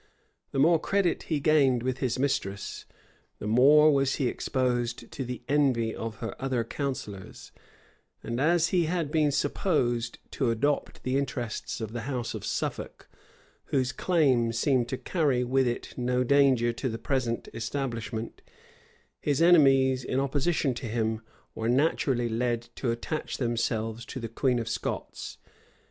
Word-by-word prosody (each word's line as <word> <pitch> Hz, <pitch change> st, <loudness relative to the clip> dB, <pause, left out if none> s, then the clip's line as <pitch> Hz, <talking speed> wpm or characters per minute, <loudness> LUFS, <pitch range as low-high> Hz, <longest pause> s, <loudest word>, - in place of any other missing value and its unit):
The -, -, -4 dB
more 160 Hz, +4 st, +5 dB
credit 195 Hz, -2 st, +1 dB
he 155 Hz, -3 st, +1 dB
gained 140 Hz, -5 st, +3 dB
with 130 Hz, 0 st, -2 dB
his 125 Hz, -2 st, -1 dB
mistress, 100 Hz, -7 st, -2 dB, 0.5 s
the -, -, -7 dB
more 145 Hz, +7 st, +6 dB
was 135 Hz, -1 st, +2 dB
he 135 Hz, -, 0 dB
exposed 120 Hz, -2 st, -1 dB
to 135 Hz, -, -4 dB
the 125 Hz, -1 st, -6 dB
envy 130 Hz, -6 st, +2 dB
of 115 Hz, -1 st, -5 dB
her 115 Hz, -1 st, -6 dB
other 130 Hz, -3 st, 0 dB
counsellors; 115 Hz, -7 st, -6 dB, 0.7 s
and 115 Hz, +2 st, -3 dB
as 170 Hz, +2 st, +3 dB
he 175 Hz, -2 st, +2 dB
had 165 Hz, -3 st, -1 dB
been 150 Hz, -2 st, +3 dB
supposed 120 Hz, -6 st, 0 dB
to 130 Hz, -4 st, 0 dB
adopt 140 Hz, +6 st, -1 dB
the 130 Hz, +1 st, 0 dB
interests 125 Hz, -6 st, -4 dB
of 110 Hz, -1 st, -5 dB
the 120 Hz, +2 st, -4 dB
house 125 Hz, -3 st, -3 dB
of -, -, -6 dB
Suffolk, -, -, -4 dB, 0.6 s
whose 130 Hz, -2 st, 0 dB
claim 135 Hz, -10 st, +2 dB
seemed 120 Hz, +1 st, +1 dB
to 130 Hz, -, -2 dB
carry 140 Hz, -7 st, +1 dB
with 130 Hz, +1 st, +2 dB
it 120 Hz, -, -3 dB
no 125 Hz, 0 st, 0 dB
danger 130 Hz, -3 st, +4 dB
to 130 Hz, +3 st, -3 dB
the 115 Hz, -, -4 dB
present 120 Hz, -3 st, -2 dB
establishment, 115 Hz, -2 st, -4 dB, 0.8 s
his 145 Hz, -2 st, 0 dB
enemies, 135 Hz, -6 st, +5 dB
in 130 Hz, -, -1 dB
opposition 140 Hz, +1 st, +1 dB
to 120 Hz, 0 st, -6 dB
him, 110 Hz, 0 st, -1 dB, 0.3 s
were 115 Hz, +1 st, -2 dB
naturally 130 Hz, -2 st, +2 dB
led 120 Hz, +1 st, -1 dB
to 125 Hz, -, -2 dB
attach 120 Hz, +7 st, -3 dB
themselves 115 Hz, -2 st, -1 dB
to 130 Hz, -, -6 dB
the 115 Hz, -, -4 dB
queen 125 Hz, +2 st, +1 dB
of 115 Hz, -1 st, -3 dB
Scots. -, -, -4 dB
130 Hz, 150 wpm, -28 LUFS, 115-140 Hz, 0.8 s, more